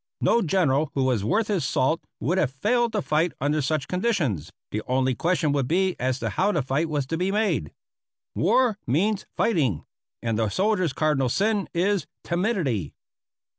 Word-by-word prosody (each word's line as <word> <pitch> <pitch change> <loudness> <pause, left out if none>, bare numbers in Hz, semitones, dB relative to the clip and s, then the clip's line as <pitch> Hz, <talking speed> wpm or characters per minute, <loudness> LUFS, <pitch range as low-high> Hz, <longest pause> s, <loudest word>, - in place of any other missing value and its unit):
No 235 - +3
general 155 -5 +2
who 135 - +1
was 125 -6 +1
worth 210 - +1
his 195 -7 0
salt 130 +5 +1 0.2
would 170 - 0
have 140 -7 +1
failed 230 - +1
to 210 -4 0
fight 155 +3 +1
under 150 +3 +1
such 145 0 -1
conditions; 170 - -1 0.2
the 105 - -2
only 130 0 +1
question 165 +2 +1
would 140 -3 0
be 185 +4 +1
as 130 0 0
to - - -1
how 200 +2 +1
the 155 -8 0
fight 140 +5 -1
was 145 -3 -1
to 165 +5 -3
be 185 +2 0
made. 190 - 0 0.6
War 225 +3 +2
means 190 - +1
fighting; 145 - +1 0.4
and 115 -2 -1
the 110 -2 +1
soldier's 185 - +1
cardinal 135 -3 +1
sin 205 - 0
is 185 0 0 0.2
timidity. 170 - -1
160 Hz, 170 wpm, -25 LUFS, 130-195 Hz, 0.6 s, No